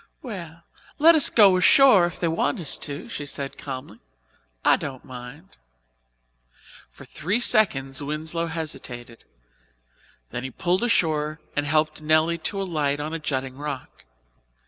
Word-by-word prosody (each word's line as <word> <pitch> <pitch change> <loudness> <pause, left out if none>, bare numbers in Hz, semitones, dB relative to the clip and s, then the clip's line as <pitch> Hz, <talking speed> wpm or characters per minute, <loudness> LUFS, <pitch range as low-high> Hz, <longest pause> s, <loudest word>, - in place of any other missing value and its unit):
"Well, 170 - -8 0.3
let 325 +3 +7
us 310 -3 +6
go 200 -5 +6
ashore 195 0 +6
if 175 - -9
they 170 - 0
want 160 -2 -1
us 160 -5 +1
to," 145 -1 -5
she 145 - -6
said 140 -1 -5
calmly. 130 -2 -8 0.7
"I - - +6
don't 130 -2 -7
mind." 130 +7 -11 1.3
For - - -15
three 185 +9 -2
seconds 145 - +2
Winslow 155 +3 -3
hesitated. 125 -8 -7 1.1
Then 125 - -5
he 130 - -4
pulled 175 - -1
ashore 155 -9 +1 0.2
and 145 0 -1
helped 155 0 0
Nelly 155 +2 +2
to 200 - -5
alight 150 -7 -1
on 155 +2 -4
a 165 - -3
jutting 130 -3 -3
rock. 145 - -7
155 Hz, 140 wpm, -24 LUFS, 140-175 Hz, 1.3 s, let